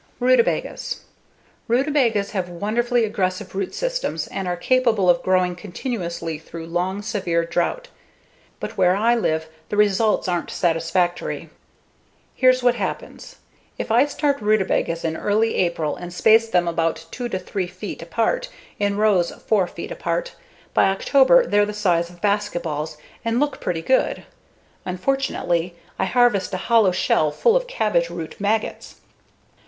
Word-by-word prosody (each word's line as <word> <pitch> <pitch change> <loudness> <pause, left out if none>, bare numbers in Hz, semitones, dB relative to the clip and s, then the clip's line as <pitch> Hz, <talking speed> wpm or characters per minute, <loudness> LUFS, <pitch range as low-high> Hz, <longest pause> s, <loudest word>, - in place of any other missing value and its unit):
Rutabagas 255 - +1 0.7
Rutabagas 240 -5 +2
have 185 -4 -2
wonderfully 230 +6 0
aggressive 190 -2 -2
root 195 -1 -3
systems - - -2
and 190 -1 -5
are 175 0 -1
capable 220 -2 +3
of 170 - 0
growing 185 -1 +1
continuously 175 - -4
through 165 +1 -9
long, 180 +4 -2
severe 185 -6 -1
drought. 175 - -2 0.7
But - - -6
where 180 0 +4
I 225 +4 +3
live, 160 -9 0 0.2
the 205 - -2
results 210 0 +2
aren't 175 -2 -1
satisfactory. 175 +1 -1 0.8
Here's 255 -1 +3
what 245 -1 +5
happens. 240 - -5 0.4
If - - -4
I 240 +6 +5
start 290 -2 -1
rutabagas 195 -5 +1
in 160 0 -1
early 215 +5 +1
April 170 -4 0
and 175 0 -8
space 220 +5 +4
them 175 -4 +2
about 165 -1 -1
2 245 -1 -4
to 190 - -2
3 185 0 -3
feet 185 +3 -7
apart 230 - -1 0.3
in 200 0 0
rows 205 -5 +3
4 200 -5 0
feet - - -8
apart, - - -2 0.4
by - - +4
October 275 - +4
they're 205 0 +3
the 210 0 -3
size 175 -5 +1
of 175 0 -17
basketballs 170 -7 -1 0.3
and 230 +1 0
look 290 0 -1
pretty 165 -2 -2
good; 260 +7 +1 0.6
unfortunately, 180 -5 -1 0.2
I 190 - +2
harvest 240 -2 +2
a - - -1
hollow 220 0 +3
shell 175 -4 +2
full 455 - +2
of - - +1
cabbage 210 - 0
root 170 -2 -7
maggots. 215 +2 -1
200 Hz, 145 wpm, -22 LUFS, 175-235 Hz, 0.8 s, what